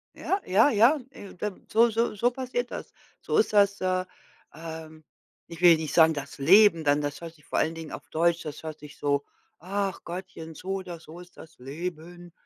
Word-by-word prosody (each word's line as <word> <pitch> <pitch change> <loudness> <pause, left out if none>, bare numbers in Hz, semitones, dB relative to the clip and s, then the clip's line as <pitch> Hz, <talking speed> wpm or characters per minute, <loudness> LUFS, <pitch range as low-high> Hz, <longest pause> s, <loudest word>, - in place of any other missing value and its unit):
Ja, 390 - -1
ja, 195 +10 +4
ja. 235 +6 +4
Äh, 200 -7 -12
da 205 +1 -4
so 230 +2 +4
so 230 +2 0
so 235 +5 +2
passiert 245 -1 -3
das. - - -7 0.3
So 450 - -1
ist 435 - +2
das 200 -2 +3
äh, 185 0 0 0.5
ähm, 160 -1 -9 0.4
ich 170 0 -10
will 175 -2 +8
nicht 160 -1 -4
sagen 160 -1 +6
das 145 -1 -7
Leben 170 +3 +6
dann, 145 0 +2
das 145 0 -4
hört 165 -1 -8
sich 150 -1 -23
vor - - -3
allen 160 - +1
Dingen 160 -2 -8
auf - - -9
Deutsch 170 +1 +1
das 150 - -7
hört 155 -1 -7
sich 150 0 -13
so: 140 -1 0 0.4
„Ach 195 +2 -3
Gottchen, 170 -2 -8
so 180 - -12
oder 180 -3 -6
so 160 +1 -12
ist 180 0 -14
das 160 - -14
Leben.“ 170 +5 -7
170 Hz, 200 wpm, -27 LUFS, 160-200 Hz, 0.5 s, will